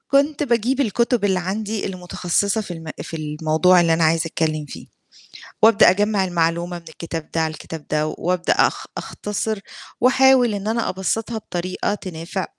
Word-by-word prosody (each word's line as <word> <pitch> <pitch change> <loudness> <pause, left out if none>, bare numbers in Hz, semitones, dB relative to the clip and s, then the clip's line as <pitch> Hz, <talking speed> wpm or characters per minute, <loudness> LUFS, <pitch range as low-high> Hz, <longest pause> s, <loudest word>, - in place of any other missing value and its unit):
كنت 285 +2 +3
باجيب 245 0 +1
الكتب 235 -2 +1
اللي 190 -2 +2
عندي 205 +3 -3
المتخصصة 185 +2 -1
في 205 - -8
الم 165 -2 -7 0.2
في 165 +1 -6
الموضوع 155 +4 +3
اللي 170 -1 +3
أنا 165 0 +2
عايزة 160 +1 +2
أتكلّم 155 -2 -1
فيه، - - -9 0.8
وأبدأ 225 0 +7
أجمّع 205 +1 +2
المعلومة 175 0 -1
من 170 - -23
الكتاب 165 0 -7
ده 165 - 0
على 160 -1 0
الكتاب 160 0 -9
ده 155 0 0
وأبدأ 175 +2 0
أخ - - +1
أختصر 210 +1 -3 0.4
وأحاول 255 -2 +5
إن 200 0 -4
أنا 230 +1 0
أبسطها 220 +5 -2
بطريقة 185 -1 -3
تنافع 185 -1 -5
185 Hz, 155 wpm, -21 LUFS, 165-220 Hz, 0.8 s, وأبدأ